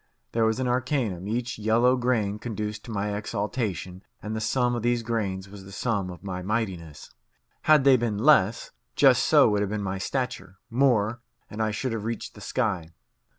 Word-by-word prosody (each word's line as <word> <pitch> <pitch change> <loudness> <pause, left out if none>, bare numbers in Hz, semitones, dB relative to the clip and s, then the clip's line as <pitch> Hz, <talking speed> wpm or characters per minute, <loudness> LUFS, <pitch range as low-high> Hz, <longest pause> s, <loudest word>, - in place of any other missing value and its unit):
There 115 -1 +2
was 110 0 +1
the 130 - -1
arcanum; 125 - -1
each 120 +1 -3
yellow 115 +4 +3
grain 115 -5 0
conduced 105 -2 -4
to 115 - -8
my 105 -1 -2
exaltation, 100 -3 -3 0.2
and 110 +1 -5
the 110 - -3
sum 125 +2 +1
of 120 - -2
these 120 0 +1
grains 100 -5 -2
was 100 0 -11
the 95 - -12
sum 100 -2 -1
of 90 +1 -10
my 90 -2 -4
mightiness. 90 -7 -4 0.6
Had 155 -3 +7
they 135 -1 +6
been 115 -3 -1
less, 115 -4 +3 0.2
just - - +5
so - - +5
would 105 -1 +1
have 100 - -1
been 105 0 -2
my 95 0 -3
stature; 95 -5 -3
more, 120 -3 +2 0.3
and 105 - -4
I 110 - +1
should 115 +5 -2
have 110 -2 -3
reached 115 0 -4
the 105 - -13
sky. 95 -8 -1
110 Hz, 190 wpm, -26 LUFS, 100-120 Hz, 0.6 s, Had